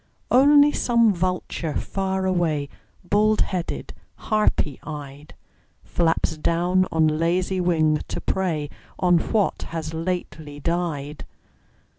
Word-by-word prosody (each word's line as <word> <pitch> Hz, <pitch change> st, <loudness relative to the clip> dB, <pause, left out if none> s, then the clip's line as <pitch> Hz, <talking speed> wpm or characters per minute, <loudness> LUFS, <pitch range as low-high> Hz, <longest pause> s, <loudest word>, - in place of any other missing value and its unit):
Only 290 Hz, +3 st, +6 dB
some 235 Hz, -5 st, +3 dB
vulture 180 Hz, -3 st, -2 dB
far 190 Hz, -1 st, -2 dB
away, 165 Hz, -6 st, 0 dB, 0.3 s
Bald 210 Hz, +3 st, +2 dB
headed, 180 Hz, -3 st, -3 dB, 0.2 s
harpy 210 Hz, -, 0 dB
eyed, 145 Hz, -1 st, -9 dB, 0.5 s
Flaps 165 Hz, -2 st, 0 dB
down 175 Hz, +4 st, +1 dB
on 160 Hz, -1 st, +3 dB
lazy 175 Hz, +4 st, 0 dB
wing 160 Hz, -3 st, +2 dB
to -, -, -4 dB
prey 160 Hz, -6 st, -2 dB, 0.3 s
On 180 Hz, -2 st, +3 dB
what 210 Hz, +3 st, 0 dB
has 160 Hz, -1 st, -5 dB
lately 160 Hz, -3 st, -4 dB
died. 155 Hz, -3 st, -3 dB
175 Hz, 105 wpm, -23 LUFS, 155-190 Hz, 0.5 s, Only